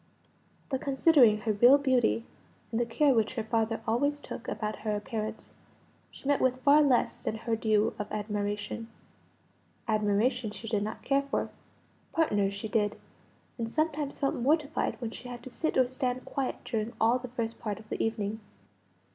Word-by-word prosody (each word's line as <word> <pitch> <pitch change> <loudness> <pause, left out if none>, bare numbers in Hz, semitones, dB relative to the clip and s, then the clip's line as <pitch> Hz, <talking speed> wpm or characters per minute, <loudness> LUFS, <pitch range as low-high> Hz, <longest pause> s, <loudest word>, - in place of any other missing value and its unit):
But 265 -2 -2
considering 270 -6 +5
her 220 - 0
real 245 +7 +7
beauty, 255 -4 +2 0.5
and 225 - 0
the 240 - +1
care 275 +4 +3
which 225 +1 +1
her 225 - -1
father 225 0 0
always 285 +6 +1
took 235 -4 -8
about 210 0 -3
her 215 -1 -2
appearance, 215 +1 -5 0.6
she - - -11
met 285 -1 +3
with 255 0 +1
far 290 +1 +7
less 270 -5 +2
than - - -2
her 225 +1 -1
due 215 -1 +2
of 210 - -4
admiration. 210 +1 -3 1.0
Admiration 215 +3 +1
she 225 +2 -9
did 210 -2 0
not 215 +1 -4
care 275 0 +2
for; 280 0 -2 0.6
partners 205 -11 +1
she 200 +2 -4
did; 210 -1 0 0.6
and 230 -1 -2
sometimes 300 0 -1
felt 275 - +1
mortified 295 +4 0
when 235 -3 -4
she 245 - -9
had 240 -1 -8
to 260 - -9
sit 315 +5 -1
or 260 - +6
stand 255 0 -3
quiet 275 -2 -2
during 225 -1 -2
all 235 +3 +4
the 255 - -7
first 230 -2 -4
part 210 -3 -3
of 220 - -14
the - - -1
evening. 220 -1 -2
230 Hz, 170 wpm, -29 LUFS, 215-265 Hz, 1.0 s, real